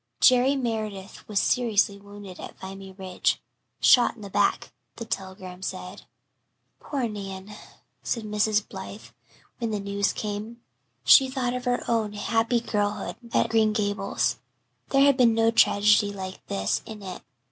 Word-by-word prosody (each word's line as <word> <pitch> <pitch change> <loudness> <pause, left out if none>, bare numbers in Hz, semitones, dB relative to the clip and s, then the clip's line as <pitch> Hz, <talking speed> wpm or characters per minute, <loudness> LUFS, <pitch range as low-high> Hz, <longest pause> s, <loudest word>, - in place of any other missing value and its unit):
Jerry 255 +2 +5
Meredith 215 -6 -4
was 210 -2 0
seriously 220 -4 +2
wounded 200 -2 -11
at - - -9
Vimy 195 0 -8
Ridge 190 -1 -1 0.4
shot 245 -2 +5
in 215 - -12
the 200 - -8
back, - - +1 0.2
the 230 - -7
telegram 190 -2 -6
said. - - -6 0.7
"Poor 270 -5 -2
Nan," 195 -2 -7 0.5
said 230 - -2
Mrs. 210 0 +1
Blythe, 195 +2 -8 0.6
when 230 -2 -1
the 210 -1 -2
news 200 0 0
came. 215 +2 -5 0.4
She 265 -2 +7
thought 255 -2 -1
of 250 0 -4
her 245 0 0
own 220 -3 0
happy 225 +3 +1
girlhood 205 -3 -2
at - - -5
old - - +3
Green 220 -1 +3
Gables. 205 -2 -1 0.5
There 275 0 +4
had 280 -2 +5
been 235 -3 +5
no 225 0 +3
tragedy 210 -2 +4
like 190 -1 -7
this 95 0 -1
in 215 -2 -9
it. 185 -2 -7
210 Hz, 150 wpm, -26 LUFS, 200-230 Hz, 0.7 s, She